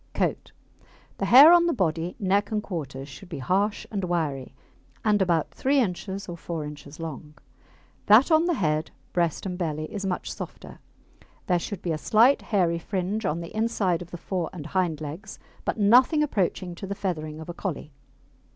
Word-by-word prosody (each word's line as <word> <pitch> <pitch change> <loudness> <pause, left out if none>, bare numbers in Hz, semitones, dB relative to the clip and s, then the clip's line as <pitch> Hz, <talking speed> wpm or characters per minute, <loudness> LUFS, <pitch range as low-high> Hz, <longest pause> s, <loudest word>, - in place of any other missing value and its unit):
COAT - - -1 0.7
The - - 0
hair 285 +7 +10
on 345 0 +5
the 335 - +2
body, 170 -4 -1
neck, 200 0 +1
and 215 -1 -1
quarters 140 -7 -5
should 160 +7 -12
be 170 - -5
harsh 195 +10 0
and 200 -3 -2
wiry, 155 -7 -2 0.5
and 210 -2 +3
about 170 -4 +1
3 275 +2 +1
inches 195 -2 -2
or 175 - -5
4 165 -2 -5
inches 150 +1 -10
long; 150 -2 -7 0.7
that 225 +10 +6
on 320 +1 +5
the 350 -1 +1
head, 155 - 0 0.2
breast, 170 -1 0
and 180 -1 -4
belly 155 -3 -2
is 200 -1 -4
much 185 -2 -3
softer. - - -9 0.7
There 180 -2 +2
should 195 +2 -6
be 175 - -1
a 155 - -2
slight 230 - +4
hairy 175 -5 +1
fringe 195 +4 -2
on 160 +3 -1
the 170 +5 -9
inside 215 -6 0
of 175 - -9
the 175 - -7
fore 180 0 -3
and 160 -5 -8
hind 165 -2 -1
legs, 160 +7 -7 0.3
but - - -1
nothing 250 +9 +5
approaching 190 - -1
to 195 - -5
the 200 - -3
feathering 155 -6 -4
of 160 - -9
a 175 - -5
Collie. 170 -4 -5
180 Hz, 185 wpm, -26 LUFS, 160-205 Hz, 0.7 s, hair